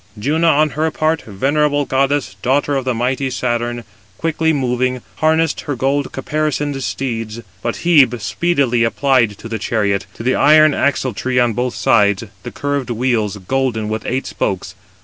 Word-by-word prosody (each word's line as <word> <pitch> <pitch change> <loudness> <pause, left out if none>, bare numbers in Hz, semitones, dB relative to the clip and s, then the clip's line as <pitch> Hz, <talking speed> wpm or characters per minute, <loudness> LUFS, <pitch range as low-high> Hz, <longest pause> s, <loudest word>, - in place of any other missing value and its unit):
Juno, 155 +9 +1
on 155 -1 +3
her 155 +2 0
part, 155 +1 0
venerable 145 +7 0
goddess, 135 -6 0
daughter 140 +2 +1
of 130 -1 -2
mighty 130 +2 0
Saturn, 120 -1 -2 0.3
quickly 160 0 0
moving, 130 -3 -1
harnessed 160 0 +1
her 145 - -3
gold 135 +3 0
caparisoned 145 0 -2
steeds; 115 -4 -4 0.2
but 120 +2 -3
Hebe 135 -9 +5
speedily 130 0 +1
applied 120 -3 +2
to 115 - -9
the 115 -1 -4
chariot, 100 -2 -1
to - - -8
the 130 +2 +2
iron 155 +1 +6
axletree 130 -2 -1
on 120 -2 +2
both 125 +2 -2
sides, 105 -3 +3 0.2
the - - -7
curved 140 -3 -3
wheels, 115 -4 0
golden, 110 +1 -1
with 110 0 -3
eight 130 +2 -1
spokes. 95 -1 -3
130 Hz, 150 wpm, -18 LUFS, 115-145 Hz, 0.3 s, iron